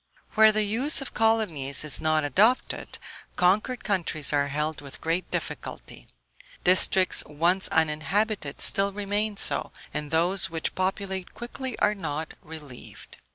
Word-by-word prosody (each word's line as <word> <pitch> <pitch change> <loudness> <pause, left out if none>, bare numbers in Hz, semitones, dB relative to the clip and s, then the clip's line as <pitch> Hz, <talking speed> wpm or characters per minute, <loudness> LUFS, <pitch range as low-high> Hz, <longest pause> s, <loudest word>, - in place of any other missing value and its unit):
Where 220 0 +6
the 215 0 0
use 240 +9 +2
of 270 - -5
colonies 200 -13 +1
is 150 - 0
not 155 -1 +1
adopted, 215 - +1 0.4
conquered 210 +8 +1
countries 170 -7 -1
are 145 -1 +1
held 150 +2 -3
with 140 -1 -7
great 165 +3 -2
difficulty; - - -6 0.6
districts 185 0 +5
once 170 +6 +1
uninhabited 160 +2 -1
still 200 0 +4
remain 205 +1 -3
so, - - 0 0.2
and 150 -1 -4
those 170 +3 +1
which 165 -1 -3
populate 190 0 -3
quickly 250 +1 -7
are 210 - +2
not 160 -5 -5
relieved. 150 -6 -12
185 Hz, 130 wpm, -26 LUFS, 155-210 Hz, 0.6 s, Where